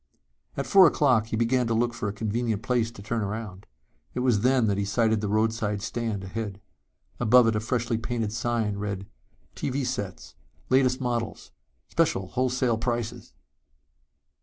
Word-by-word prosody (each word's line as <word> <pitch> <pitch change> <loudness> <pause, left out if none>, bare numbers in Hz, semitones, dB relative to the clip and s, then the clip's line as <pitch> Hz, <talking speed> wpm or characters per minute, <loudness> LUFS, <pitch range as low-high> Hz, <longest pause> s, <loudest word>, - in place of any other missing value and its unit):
At - - -1
four 195 -3 +7
o'clock 130 -8 +3
he 115 - -3
began 120 +2 +2
to 115 - 0
look 120 +1 +1
for 115 -3 -3
a - - -2
convenient 110 +1 -2
place 120 -1 +1
to 110 -3 -12
turn 115 +2 -2
around. 100 -2 -5 0.5
It 125 - -1
was 125 -5 +3
then 125 0 +3
that 100 -2 +1
he - - +1
sighted 110 +2 +1
the 105 - -1
roadside 110 -1 0
stand 115 -5 -3
ahead. 100 0 -5 0.6
Above 120 +1 +6
it 115 -1 +2
a - - +1
freshly 115 0 -1
painted 115 -3 -2
sign 115 -3 -1
read: 100 -1 -4 0.5
TV 135 0 -2
SETS. 100 -6 -4 0.4
LATEST 130 0 +3
MODELS. 120 -3 -3 0.4
SPECIAL 95 -1 +1
WHOLESALE 125 -2 0
PRICES! 120 -1 -3
115 Hz, 160 wpm, -26 LUFS, 105-120 Hz, 0.6 s, four